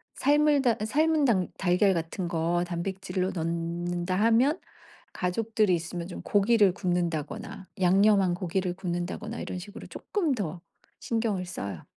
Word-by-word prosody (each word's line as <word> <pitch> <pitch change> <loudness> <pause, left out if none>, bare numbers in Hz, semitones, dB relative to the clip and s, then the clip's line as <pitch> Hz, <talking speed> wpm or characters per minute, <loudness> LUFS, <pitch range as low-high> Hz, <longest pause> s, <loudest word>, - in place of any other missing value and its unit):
삶을 295 0 +3
달 240 -4 +2
삶은 310 +5 +2
당 195 -8 +2
달걀 190 +2 +3
같은 170 +2 -3
거 170 +1 0
단백질로 185 +1 -3
넣는다 175 +1 -2
하면 230 - +3 0.5
가족들이 210 +2 +1
있으면 170 +1 -5
좀 180 - -7
고기를 205 -1 +3
굽는다거나 175 -1 -3
양념한 195 0 +4
고기를 180 +1 -2
굽는다거나 185 +5 -4
이런 - - -5
식으로 205 +4 -10
쪼끔 345 -9 -2
더 175 -6 -4 0.4
신경을 220 -5 -1
써요. 100 - -6
185 Hz, 300 characters per minute, -27 LUFS, 175-220 Hz, 0.5 s, 양념한